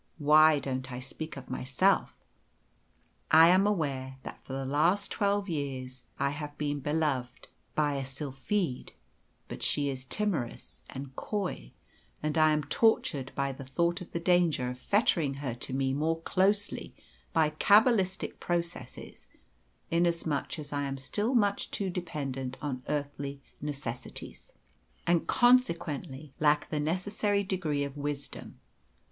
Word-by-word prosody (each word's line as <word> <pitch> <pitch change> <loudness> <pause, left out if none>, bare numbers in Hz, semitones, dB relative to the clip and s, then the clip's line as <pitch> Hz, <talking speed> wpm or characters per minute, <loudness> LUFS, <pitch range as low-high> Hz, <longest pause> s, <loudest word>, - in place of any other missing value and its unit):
Why 155 0 +6
don't 130 -1 -3
I 125 - -4
speak 145 +4 -7
of 135 -2 -9
myself? 140 +10 +1 1.1
I 160 +2 +8
am 190 +3 +5
aware 135 -9 -1
that - - -8
for 130 - -8
the 135 0 -3
last 175 +9 +2
twelve 200 0 +1
years 130 -5 -4
I 140 0 +1
have 145 0 -6
been 145 -1 -1
beloved 140 -4 -1 0.3
by 145 -2 +2
a 135 - -2
sylphide, 135 +3 -3 0.5
but - - -7
she 145 -1 +1
is 130 -1 -5
timorous 175 - -2
and 135 0 -8
coy, 185 - -3 0.5
and 150 0 0
I 155 -1 +5
am 150 0 +1
tortured 145 - +2
by 140 0 0
the 135 +1 -8
thought 170 +7 0
of 180 - -9
the 170 - -2
danger 170 -8 +2
of 125 - -9
fettering 170 - +2
her 135 -3 -3
to 120 +3 -3
me 135 0 0
more 160 +3 0
closely 200 +4 0 0.4
by 155 -2 +3
cabbalistic 200 +3 +3
processes, 170 -1 -4 0.6
inasmuch 170 -3 0
as 145 -1 -7
I 145 - 0
am 135 0 -3
still 210 - -1
much 205 -3 +2
too 195 -2 -2
dependent 140 -7 -4
on 135 -4 -3
earthly 145 -1 -3 0.2
necessities, 145 0 -6 0.5
and 170 -1 +2
consequently 165 - +2
lack 150 -1 +2
the 150 - 0
necessary 200 +6 0
degree 170 -7 -1
of 140 0 -5
wisdom. 145 -1 -5
150 Hz, 140 wpm, -30 LUFS, 135-175 Hz, 1.1 s, I